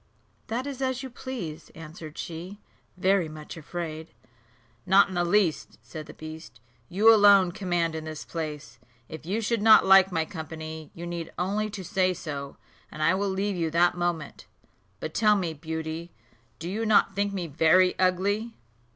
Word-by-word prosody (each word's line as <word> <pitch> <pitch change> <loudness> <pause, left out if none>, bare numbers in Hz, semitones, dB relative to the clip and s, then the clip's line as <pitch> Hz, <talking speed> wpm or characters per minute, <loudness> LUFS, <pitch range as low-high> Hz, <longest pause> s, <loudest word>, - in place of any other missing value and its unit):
"That 240 +4 -3
is 275 -2 -6
as 260 0 -1
you 260 - -7
please," 195 -12 -7
answered 160 0 -10
she, 175 +5 -7 0.4
very 185 -2 +2
much 155 +1 -9
afraid. 160 -3 -6 0.7
"Not 195 +5 +5
in - - -7
the 175 -1 +1
least," 175 -2 +1
said 150 +6 -9
the - - -10
beast; 155 -7 -10 0.3
"you 210 +5 +6
alone 200 -4 +6
command 175 -4 -1
in 160 0 -5
this 155 -1 -7
place. 155 -3 -6 0.3
If 160 0 -10
you 210 +5 -1
should 225 0 0
not 220 0 +7
like 190 0 +7
my 165 -2 0
company, 160 -3 -7
you 170 - -7
need 170 -1 -5
only 205 +4 -1
to 200 -2 -7
say 185 -1 +1
so, 140 -4 -6 0.3
and 155 - -5
I 165 - +4
will 200 +1 0
leave 195 +1 -1
you 165 -2 -1
that 175 +2 +3
moment. 175 -4 -3 0.5
But 155 +5 -5
tell 210 -1 +4
me, 175 -5 -1
Beauty, 160 +2 -5 0.5
do 165 - -7
you 210 +5 -2
not 215 -2 +3
think 200 0 0
me 190 -3 -3
very 165 +4 +4
ugly?" 200 +5 +1
175 Hz, 170 wpm, -27 LUFS, 160-200 Hz, 0.7 s, not